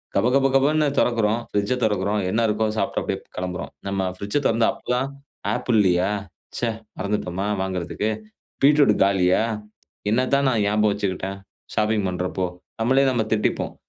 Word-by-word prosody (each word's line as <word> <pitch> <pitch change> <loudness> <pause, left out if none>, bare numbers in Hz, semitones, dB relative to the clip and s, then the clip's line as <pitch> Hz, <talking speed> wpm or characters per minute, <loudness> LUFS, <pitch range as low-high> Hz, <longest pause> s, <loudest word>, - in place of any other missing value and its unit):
கப 110 +5 +3
கப 135 0 +4
கபன்னு 150 +3 +3
தொறக்குறோம். 115 -2 +2
பிரிட்ஜ்ஐ 105 +5 0
தொறக்கிறோம். 105 0 0
என்னா 110 +4 +1
இருக்கோ, 105 +1 +1
சாப்புட்டு - - 0
அப்பிடியே - - -2 0.2
கிளம்புறோம். 90 -1 -4 0.2
நம்ம 100 -1 -1 0.2
பிரிட்ஜ்ஐ 105 +9 -1
தொறந்தா, 115 0 +3
அப்போது 125 - -4
தான் 135 +2 -1 0.4
"ஆப்பிள் 120 -3 +1
இல்லையா? 90 0 +3 0.5
ச்சே 120 - 0 0.3
மறந்துட்டோமா 95 -1 -2 0.2
வாங்குறதுக்கு. 95 +3 -2 0.6
பீட்ரூட் 145 +1 +6
காலியா? 95 -1 +3 0.7
என்னத்தான் 130 +4 +2
நான் 110 -4 +1
ஞாபகம் 105 0 +3
வச்சுக்கிட்டேன், 95 -1 -3 0.4
ஷாப்பிங் 105 -2 +1
பண்றப்போ?" 90 +1 -2 0.4
நம்மளே 130 +4 +4
நம்ம 120 -3 +1
திட்டிப்போம். 105 -1 0
105 Hz, 140 wpm, -23 LUFS, 95-120 Hz, 0.7 s, பீட்ரூட்